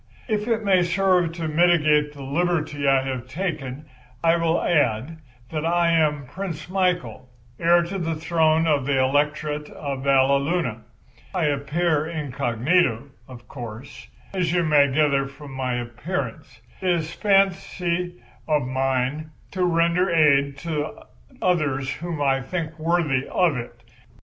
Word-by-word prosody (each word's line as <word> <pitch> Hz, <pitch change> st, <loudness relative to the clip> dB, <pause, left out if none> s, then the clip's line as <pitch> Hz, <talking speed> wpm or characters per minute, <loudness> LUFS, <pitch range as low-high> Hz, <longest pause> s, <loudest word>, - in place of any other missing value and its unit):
If 215 Hz, -2 st, -1 dB
it 225 Hz, -2 st, 0 dB
may 190 Hz, -3 st, +4 dB
serve 180 Hz, -1 st, +2 dB
to 165 Hz, -1 st, -4 dB
mitigate 155 Hz, -2 st, +3 dB
the 140 Hz, -2 st, -9 dB
liberty 150 Hz, -1 st, -1 dB
I 135 Hz, -1 st, +4 dB
have 130 Hz, -2 st, -4 dB
taken 150 Hz, -3 st, -4 dB, 0.4 s
I 165 Hz, 0 st, +4 dB
will 165 Hz, 0 st, +1 dB
add 145 Hz, 0 st, 0 dB, 0.3 s
that 155 Hz, -1 st, -2 dB
I 170 Hz, 0 st, +2 dB
am 150 Hz, -4 st, +2 dB
Prince 170 Hz, +2 st, -6 dB
Michael, 180 Hz, -8 st, -1 dB, 0.3 s
heir 170 Hz, +1 st, +4 dB
to 190 Hz, +3 st, -4 dB
the 165 Hz, -2 st, -2 dB
throne 160 Hz, 0 st, +2 dB
of 145 Hz, -4 st, +1 dB
the 140 Hz, -2 st, +2 dB
Electorate 150 Hz, +2 st, 0 dB
of 140 Hz, -3 st, -5 dB
Valleluna. 140 Hz, -1 st, +2 dB, 0.5 s
I 180 Hz, -, +1 dB
appear 150 Hz, +2 st, 0 dB
incognito, 140 Hz, -2 st, 0 dB, 0.2 s
of 120 Hz, -2 st, -12 dB
course, 120 Hz, 0 st, -9 dB, 0.3 s
as 180 Hz, -4 st, 0 dB
you 175 Hz, 0 st, +2 dB
may 145 Hz, -3 st, +4 dB
gather 140 Hz, -1 st, +2 dB
from 135 Hz, 0 st, -11 dB
my 130 Hz, -2 st, -2 dB
appearance. 120 Hz, -1 st, -5 dB, 0.2 s
It 185 Hz, -, 0 dB
is 170 Hz, -2 st, 0 dB
a -, -, -14 dB
fancy 180 Hz, -, +1 dB, 0.2 s
of 150 Hz, -3 st, +2 dB
mine 130 Hz, +3 st, -1 dB, 0.2 s
to 185 Hz, -1 st, -1 dB
render 170 Hz, +1 st, +2 dB
aid 140 Hz, -4 st, +3 dB
to 155 Hz, -2 st, -3 dB, 0.4 s
others 140 Hz, -7 st, +1 dB
whom 165 Hz, -3 st, -4 dB
I 135 Hz, -1 st, +2 dB
think 160 Hz, +2 st, -5 dB
worthy 155 Hz, -5 st, +1 dB
of 175 Hz, -5 st, +2 dB
it. 120 Hz, -1 st, -7 dB
155 Hz, 140 wpm, -23 LUFS, 135-175 Hz, 0.5 s, may